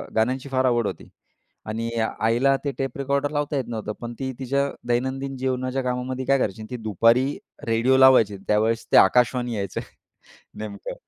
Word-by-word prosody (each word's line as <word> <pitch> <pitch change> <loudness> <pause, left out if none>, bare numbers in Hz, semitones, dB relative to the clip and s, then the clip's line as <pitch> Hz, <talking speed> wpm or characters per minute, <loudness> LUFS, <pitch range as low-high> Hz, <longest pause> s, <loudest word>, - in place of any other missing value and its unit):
गाण्यांची 130 +5 0
फार 130 -1 +1
आवड 120 -4 +2
होती - - -7 0.6
आणि 115 +2 -3 0.3
आईला 120 +5 +3
ते 140 - 0
टेप 135 -1 -3
रेकॉर्डर 140 +1 0
लावता 145 0 -1
येत 130 - -1
नव्हतं. 110 -2 -4
पण 120 0 -5
ती 130 -1 -2
तिच्या 140 +2 0 0.2
दैनंदिन 130 +3 -1
जीवनाच्या 130 0 -1
कामामध्ये 125 +1 -3
काय 135 +1 +3
करायची? 110 -3 -2
ती 125 - -4
दुपारी 115 +6 +2 0.3
रेडिओ 115 +4 +3
लावायची 130 -6 +6
आणि 100 0 -10
त्यावेळेस 110 +2 +1
ते - - +6
आकाशवाणी 125 +3 +4
यायचं 100 -2 -3 0.8
नेमकं. 105 -2 -6
125 Hz, 160 wpm, -24 LUFS, 115-135 Hz, 0.8 s, लावायची